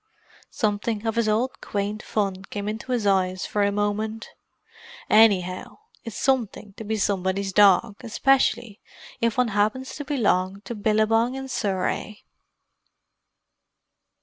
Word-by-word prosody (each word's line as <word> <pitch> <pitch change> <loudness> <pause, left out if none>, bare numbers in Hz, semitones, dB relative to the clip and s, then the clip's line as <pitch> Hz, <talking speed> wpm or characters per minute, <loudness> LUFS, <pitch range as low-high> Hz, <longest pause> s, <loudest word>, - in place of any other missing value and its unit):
Something 210 0 -2
of 225 0 -1
his 230 -2 +1
old 235 +5 -1
quaint 205 +1 -3
fun 195 -3 -2
came 205 0 -5
into 220 +4 -5
his 240 -4 0
eyes 185 -1 +1
for 210 - -1
a 200 0 +2
moment. 210 +2 -2 0.8
"Anyhow 190 -5 +3 0.3
it's 230 - -7
something 235 -6 -1
to - - -7
be 220 +1 -2
somebody's 195 -1 -1
dog—especially 220 +3 +2 0.4
if 230 0 0
one 250 -2 +2
happens 215 +6 0
to 290 - -5
belong 200 -9 0
to 235 - -7
Billabong 220 +3 +1
in 270 0 -5
Surrey!" 205 -2 -3
210 Hz, 120 wpm, -24 LUFS, 200-230 Hz, 0.8 s, Anyhow